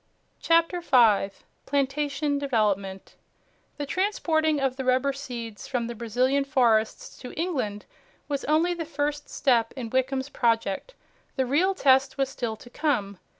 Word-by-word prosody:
CHAPTER 335 +1 +2
5 220 - +3 0.2
PLANTATION 285 +1 0
DEVELOPMENT 205 -8 -1 0.6
The 290 - -3
transporting 315 -3 +1
of 270 -2 0
the 265 - -4
rubber 255 +2 +2
seeds 235 -6 -7
from 245 -3 -1
the 235 - -4
Brazilian 250 +5 +1
forests 240 -6 +1
to 250 - -8
England 255 - -2 0.4
was 280 -2 -2
only 320 +4 +2
the 340 -1 -4
first 295 -1 -3
step 240 -5 +1
in 240 -4 -6
Wickham's 265 +1 0
project. 230 - 0 0.4
The 265 - +1
real 345 +10 +2
test 270 -4 +3
was 270 -1 +1
still 235 -4 -3
to 240 - -15
come. 215 - -1
270 Hz, 140 wpm, -26 LUFS, 235-295 Hz, 0.6 s, 5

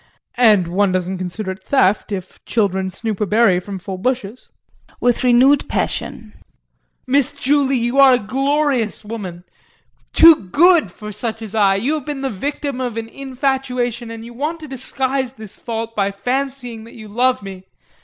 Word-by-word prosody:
And 210 -7 +5
one 190 +3 +1
doesn't 185 0 -2
consider 185 +2 -4
it 190 0 -10
theft 215 -5 +2
if 185 -2 -6
children 190 -4 0
snoop 215 +2 -4
a 210 - +1
berry 210 -3 +4
from 195 +1 -7
full 185 0 -7
bushes. 245 0 -3 0.5
[With 245 0 +1
renewed 255 +3 +4
passion]. 220 -2 -3 0.7
Miss 275 0 +2
Julie, 275 0 +1
you 240 +3 0
are 270 -2 +8
a - - +2
glorious 265 -1 0
woman 190 -6 -7 0.7
too 320 - +7
good 335 - +4
for 210 +3 -9
such 225 +2 -4
as 215 -1 -8
I. 200 -3 +3
You 245 +10 0
have 305 -3 -4
been 290 -2 -4
the 270 - -2
victim 280 +4 -4
of 245 -3 -3
an 225 0 -4
infatuation 255 -3 -2
and 230 0 -8
you 240 - -10
want 300 +7 -3
to 310 - -8
disguise 265 -1 -2
this 215 -4 -12
fault 230 -1 -5
by 200 -1 +1
fancying 245 +2 -3
that 230 - -14
you 220 -2 -10
love 245 +2 +1
me. 190 -1 -9
230 Hz, 170 wpm, -19 LUFS, 200-265 Hz, 0.7 s, are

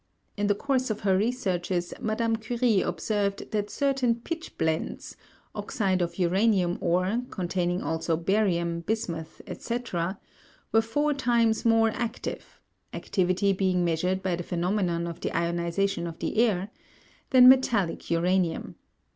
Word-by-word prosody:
In 205 0 0
the 205 - +3
course 260 +2 0
of 215 - -3
her 195 -2 +3
researches 185 -5 -1
Madame 225 +1 0
Curie 230 -2 +1
observed 200 -2 -2
that 210 -1 -1
certain 270 -3 +1
pitchblendes 235 - -3 0.4
(oxide 190 -4 -1
of 170 -1 -2
uranium 185 0 +2
ore, 185 +7 +1
containing 180 0 -1
also 160 0 -1
barium, 170 -2 +1
bismuth, 170 -5 -4
etc.) 195 -7 -3 0.5
were 225 - +5
four 290 +7 0
times 235 -5 +1
more 225 -1 +4
active 235 +1 -5 0.3
(activity 190 +1 +1
being 185 -2 +1
measured 180 +3 0
by 185 -2 0
the 175 - -5
phenomenon 175 0 -1
of 170 0 -6
the - - -3
ionization 170 +2 -1
of 165 -1 -7
the - - -3
air) 205 -4 +2 0.6
than 255 -2 +8
metallic 245 -9 +3
uranium. 170 0 0
195 Hz, 130 wpm, -27 LUFS, 175-225 Hz, 0.6 s, than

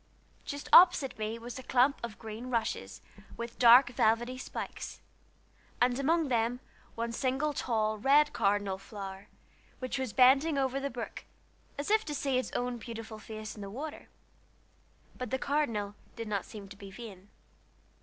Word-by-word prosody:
Just 285 -1 -5
opposite 340 -9 +7
me 215 +1 -2
was 235 +1 -7
a - - -6
clump 260 +2 +3
of 225 -3 -5
green 225 +2 -7
rushes, 225 - -2 0.4
with 235 0 -6
dark 245 +1 +8
velvety 240 +2 +2
spikes, 255 - -6 0.8
and 245 +1 +2
among 320 +3 +2
them 235 0 +1 0.4
one 230 0 -2
single 265 +5 0
tall, 215 -5 0
red 290 +5 +4
cardinal 200 -1 +1
flower, 195 0 -8 0.5
which 255 +1 -3
was 260 -4 -2
bending 270 +5 +5
over 270 0 0
the 280 +1 -2
brook 235 -2 -7 0.5
as 285 +7 -3
if 435 0 +4
to 295 - -3
see 270 -2 +1
its 255 - -4
own 245 -1 -2
beautiful 225 -2 -8
face 215 0 -7
in 210 - -10
the 200 - -6
water. 290 +8 -7 1.1
But 250 -2 -4
the 265 - 0
cardinal 235 -8 -1 0.2
did 230 -2 -5
not 200 -3 -2
seem 205 -2 -9
to 200 - -10
be 200 0 -10
vain. 200 -2 -11
240 Hz, 160 wpm, -31 LUFS, 215-270 Hz, 1.1 s, dark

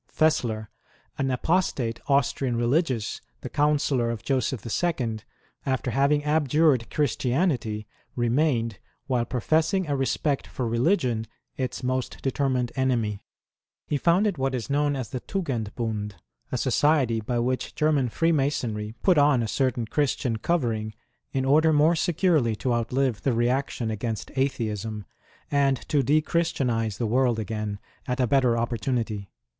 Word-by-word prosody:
Fessler, 115 -9 +1 0.5
an 135 - +1
apostate 130 -4 0
Austrian 135 -2 +1
religious, 125 -1 0 0.2
the - - -7
Councillor 145 -4 +2
of 115 -2 -4
Joseph 130 -4 -1 0.2
II., 125 -10 0 0.4
after 130 -2 -1
having 140 +4 +2
abjured 150 -4 +2
Christianity, 130 - 0 0.3
remained, 120 -3 +1 0.3
while 125 -4 0
professing 160 - +1
a 145 -2 -1
respect 135 +1 0
for 125 - -3
religion, 120 - +1 0.3
its 130 0 -3
most 130 0 -2
determined 130 -2 0
enemy. 120 -6 0 0.7
He 145 - 0
founded 175 +3 +2
what 135 0 0
is 125 +3 -4
known 145 0 +2
as 130 -4 -4
the 130 - -4
Tugenbund, 115 - -3 0.4
a - - 0
society 135 -7 +2
by 120 +3 -2
which 125 +2 -1
German 150 -5 +2
Freemasonry 130 -8 0
put 180 -5 +5
on 145 -4 +4
a - - -2
certain 125 -1 0
Christian 125 -2 0
covering, 110 -7 -1 0.4
in 130 -1 -1
order 155 +4 +4
more 155 +3 +4
securely 165 - +2
to 125 +3 -1
outlive 120 -1 0
the 135 - +1
reaction 120 -1 0
against 110 -1 -4
Atheism, 110 -6 -2 0.5
and 140 -2 +3
to 145 - +3
de 145 +4 +3
Christianize 125 - 0
the 115 - -1
world 120 +1 +2
again 105 -1 -3 0.3
at 125 0 -2
a 125 - +4
better 125 -1 +3
opportunity. 115 -3 -2
130 Hz, 135 wpm, -26 LUFS, 115-145 Hz, 0.7 s, put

